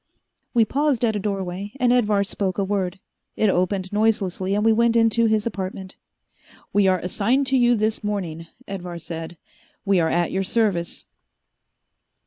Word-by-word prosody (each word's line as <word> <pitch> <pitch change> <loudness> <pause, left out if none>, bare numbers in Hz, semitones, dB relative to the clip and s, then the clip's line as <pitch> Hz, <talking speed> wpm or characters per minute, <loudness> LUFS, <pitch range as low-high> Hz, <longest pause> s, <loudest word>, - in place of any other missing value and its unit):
We 230 -2 +5
paused 280 -2 +1
at 220 -2 0
a - - -1
doorway, 195 0 -4
and 245 -1 +3
Edvar 210 -5 +2
spoke 195 -1 -2
a 200 - +1
word. 190 -1 -2 0.4
It 215 -3 +2
opened 185 +1 -1
noiselessly 200 -3 +1
and 210 +1 0
we 225 - +5
went 235 +1 +2
into 230 0 +3
his 215 -1 +1
apartment. 190 -3 -5 0.8
"We 205 -1 +4
are 185 -1 +3
assigned 215 +10 0
to 265 - +2
you 240 -1 +4
this 215 0 -1
morning," 175 -6 -3 0.2
Edvar 180 -3 -6
said. 165 0 -7 0.5
"We 195 -2 +3
are 160 -1 +2
at 175 0 0
your 190 +1 0
service." 190 -5 -1
200 Hz, 160 wpm, -23 LUFS, 185-225 Hz, 0.8 s, We